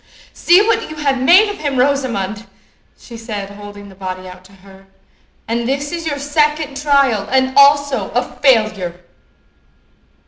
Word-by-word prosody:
"See 360 +4 +4
what 450 0 0
you 310 - -8
have 275 -4 -1
made 365 +11 +6
of 410 - -6
him, 285 -3 -3
Rosamond!" 235 -6 -1 0.5
she 235 - -13
said, 210 -3 -7
holding 205 0 -11
the 195 - -14
body 185 -1 -7
out 185 0 -12
to 190 - -18
her; 195 0 -18 0.6
"and 235 +1 -2
this 280 +2 -2
is 335 -1 -5
your 290 -2 -2
second 295 0 -1
trial, 275 -8 +2
and 260 0 +1
also 285 -1 +3
a - - +1
failure." 215 -10 0
260 Hz, 150 wpm, -16 LUFS, 205-290 Hz, 0.6 s, made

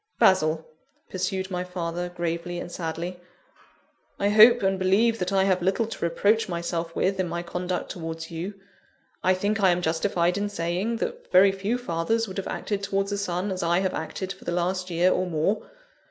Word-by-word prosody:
"Basil," 160 -4 +3 0.5
pursued 190 0 -2
my 180 0 -1
father, 175 -1 -4
gravely 175 0 -3
and 175 - -7
sadly; 170 +1 -4 1.0
"I 200 - +1
hope 220 +2 +7
and 190 0 +1
believe 215 +5 +3
that 180 +1 -1
I 195 -1 +3
have 185 -2 +2
little 190 +6 +1
to 225 - -6
reproach 205 +6 +2
myself 170 -1 -3
with 190 0 0
in 185 - +1
my 170 +1 -3
conduct 180 +1 -3
towards 165 -1 -6
you. 175 +5 -5 0.7
I 185 0 +4
think 205 +3 -1
I 190 - +6
am 180 0 +1
justified 170 +2 +1
in 205 0 -1
saying, 185 +4 -1
that - - -5
very 190 +2 +7
few 195 +5 -1
fathers 225 +1 -1
would 190 - -8
have 195 - -3
acted 205 -2 -3
towards 195 0 -1
a 205 - -1
son 185 0 -2
as 185 - -3
I 170 0 +2
have 190 - 0
acted 185 +4 -4
for 190 - -17
the - - -3
last 180 +1 -1
year 175 +2 +3
or 185 0 0
more. 170 +5 -1
185 Hz, 190 wpm, -26 LUFS, 170-195 Hz, 1.0 s, hope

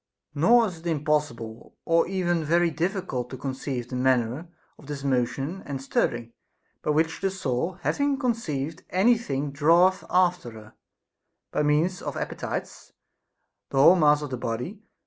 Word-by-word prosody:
Nor 230 +11 +5
is 180 -6 -6
it 170 - -7
impossible 145 -8 -2
or 165 0 +3
even 175 -3 0
very 170 +2 +2
difficult 165 - -2
to 130 - -7
con 135 +1 -4
ceive 130 -2 -4
the 125 - -5
manner 130 +4 +1 0.3
of 140 - -15
this 145 -2 -5
motion 135 +6 -1
and 140 -2 -4
stirring, 120 -3 -1 0.5
by - - -3
which 160 +2 +1
the 195 - +1
soul 170 -3 -2
having 285 -1 +1
conceived 170 - -2
any 210 +7 +4
thing 145 - -3
draweth 170 +6 +4
after 180 -7 +2
her, 110 -1 -13 0.8
by - - 0
means 155 +5 +1
of - - -5
appetites, - - -5 0.8
the 135 - -4
whole 145 +7 +8
mass 150 -3 +4
of 145 - -6
the 130 - -2
body. 120 - -4
150 Hz, 155 wpm, -26 LUFS, 135-180 Hz, 0.8 s, whole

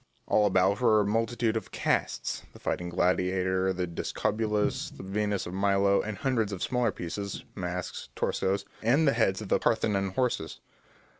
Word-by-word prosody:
All 105 -1 +3
about 95 +3 +2
were 110 -3 +5
a - - 0
multitude 115 +2 0
of 110 - -3
casts, - - -1
the - - -14
fighting 90 0 -2
gladiator, 95 +1 +1
the 90 -1 -1
discobulus, 105 +4 -1
the - - -11
Venus 100 +1 -1
of 90 - -6
Milo, 100 0 +3
and 105 -1 -5
hundreds 115 -4 0
of 95 -3 -4
smaller 125 -3 +1
pieces, 90 +3 -5
masks, 90 -1 -5
torsos, 100 +1 0 0.2
and 140 +8 +3
the 140 - +5
heads 110 -4 +1
of 100 - -9
the - - +3
Parthenon 100 -4 +1
horses. 115 - -1
100 Hz, 160 wpm, -28 LUFS, 95-110 Hz, 0.2 s, were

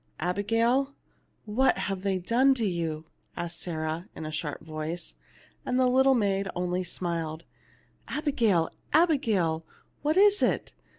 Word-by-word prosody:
"Abigail, 230 - +1 0.5
what 235 +5 +2
have 195 -2 -2
they 195 -1 0
done 245 +9 +3
to 235 -4 0
you 165 -4 -2 0.2
?" - - -34
asked 170 0 -4
Sarah, 160 +1 -3
in 160 - -6
a 155 - -4
sharp 150 -1 -3
voice; 155 +2 -5 0.5
and 255 0 0
the 255 - +4
little 265 +1 +5
maid 200 -3 +1
only 180 +1 -1
smiled. 165 -3 -3 0.4
" - - -35 0.2
Abigail, 230 - +1 0.3
Abigail, 215 - +2 0.4
what 305 +4 +1
is 410 +1 +6
it - - 0
195 Hz, 140 wpm, -28 LUFS, 165-255 Hz, 0.5 s, is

